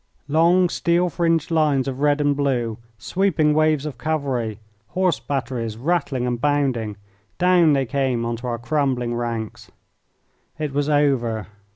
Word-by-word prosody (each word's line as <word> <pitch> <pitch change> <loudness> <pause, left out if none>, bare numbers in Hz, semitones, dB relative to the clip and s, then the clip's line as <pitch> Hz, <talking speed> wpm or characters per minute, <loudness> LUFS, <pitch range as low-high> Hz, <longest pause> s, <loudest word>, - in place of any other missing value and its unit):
Long 170 +5 +4
steel 175 +1 +1
fringed 165 -1 0
lines 150 -4 +2
of 135 -1 -4
red 145 0 +2
and 145 -1 +2
blue, 125 -6 -1 0.2
sweeping 155 - +1
waves 155 -1 +2
of 150 - -6
cavalry, 135 -9 -2 0.3
horse 185 -3 0
batteries 120 -5 -3
rattling 135 -2 -1
and 120 -1 -2
bounding 135 -8 0 0.4
down 175 -3 +4
they 135 -1 +1
came 130 -2 -1
on 115 0 -2
to 120 +2 -7
our 120 -1 -2
crumbling 125 -1 -1
ranks. 115 -2 -4 0.9
It 150 -3 -3
was 145 +1 0
over. 130 -7 +1
140 Hz, 145 wpm, -22 LUFS, 120-155 Hz, 0.9 s, Long